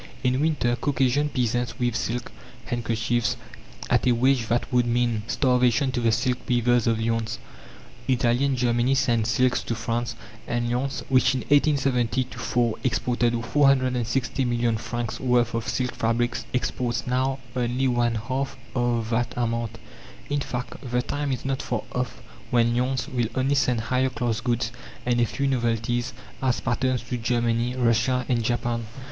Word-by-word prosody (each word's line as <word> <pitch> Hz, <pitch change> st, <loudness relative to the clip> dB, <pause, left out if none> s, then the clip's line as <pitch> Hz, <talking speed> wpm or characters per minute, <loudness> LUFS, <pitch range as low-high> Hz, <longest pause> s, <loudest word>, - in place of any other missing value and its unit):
In 130 Hz, +1 st, +2 dB
winter, 150 Hz, -6 st, +1 dB
Caucasian 135 Hz, +2 st, +1 dB
peasants 120 Hz, -3 st, -1 dB
weave 120 Hz, -3 st, 0 dB
silk 120 Hz, +2 st, -2 dB, 0.3 s
handkerchiefs 115 Hz, -1 st, 0 dB, 0.5 s
at -, -, +2 dB
a -, -, +5 dB
wage 125 Hz, 0 st, +2 dB
that 120 Hz, +4 st, -1 dB
would 125 Hz, -1 st, +3 dB
mean 120 Hz, -2 st, +1 dB
starvation 125 Hz, +1 st, +2 dB
to 125 Hz, -, -1 dB
the 115 Hz, -1 st, +3 dB
silk 125 Hz, +3 st, +1 dB
weavers 120 Hz, -1 st, +3 dB
of 115 Hz, -1 st, +2 dB
Lyons. 115 Hz, 0 st, -1 dB, 0.7 s
Italy 125 Hz, 0 st, +2 dB
and 135 Hz, -2 st, +1 dB
Germany 120 Hz, +2 st, +2 dB
send 120 Hz, -5 st, +2 dB
silks 125 Hz, +1 st, +2 dB
to 115 Hz, -, -3 dB
France; 115 Hz, +1 st, -2 dB, 0.3 s
and 120 Hz, 0 st, -1 dB
Lyons, 130 Hz, +3 st, -2 dB
which 130 Hz, -1 st, +4 dB
in 130 Hz, -, -1 dB
1870 135 Hz, -4 st, +2 dB
4 120 Hz, -2 st, 0 dB
exported 120 Hz, -1 st, +1 dB
460 130 Hz, -1 st, +2 dB
million 120 Hz, -2 st, +1 dB
francs' 115 Hz, +1 st, -4 dB
worth 125 Hz, -2 st, +2 dB
of 115 Hz, -1 st, -2 dB
silk 125 Hz, -1 st, -1 dB
fabrics, 120 Hz, +2 st, 0 dB
exports 125 Hz, -1 st, -1 dB
now 130 Hz, +1 st, 0 dB, 0.2 s
only 125 Hz, +1 st, 0 dB
one 120 Hz, -2 st, +1 dB
half 130 Hz, +5 st, -3 dB, 0.2 s
of 120 Hz, -2 st, 0 dB
that 120 Hz, +1 st, +1 dB
amount. 115 Hz, -1 st, -1 dB, 0.5 s
In 145 Hz, -, +1 dB
fact, 125 Hz, -2 st, -4 dB
the 125 Hz, -1 st, -1 dB
time 145 Hz, +1 st, -2 dB
is 130 Hz, -1 st, -3 dB
not 135 Hz, +1 st, -1 dB
far 120 Hz, -5 st, -2 dB
off 125 Hz, 0 st, -3 dB, 0.3 s
when 120 Hz, -1 st, +3 dB
Lyons 125 Hz, -1 st, 0 dB
will 120 Hz, -3 st, 0 dB
only 130 Hz, +2 st, +2 dB
send 125 Hz, -5 st, +2 dB
higher 130 Hz, +3 st, +1 dB
class 120 Hz, -3 st, -2 dB
goods 120 Hz, 0 st, 0 dB, 0.3 s
and 120 Hz, -1 st, +2 dB
a 120 Hz, -, +3 dB
few 140 Hz, +6 st, -2 dB
novelties 120 Hz, -1 st, 0 dB, 0.3 s
as 130 Hz, -2 st, +1 dB
patterns 125 Hz, -1 st, 0 dB
to 125 Hz, +1 st, -3 dB
Germany, 120 Hz, +1 st, 0 dB
Russia 125 Hz, +1 st, +2 dB
and 120 Hz, -2 st, +1 dB
Japan. 120 Hz, 0 st, -1 dB
120 Hz, 155 wpm, -25 LUFS, 115-130 Hz, 0.7 s, a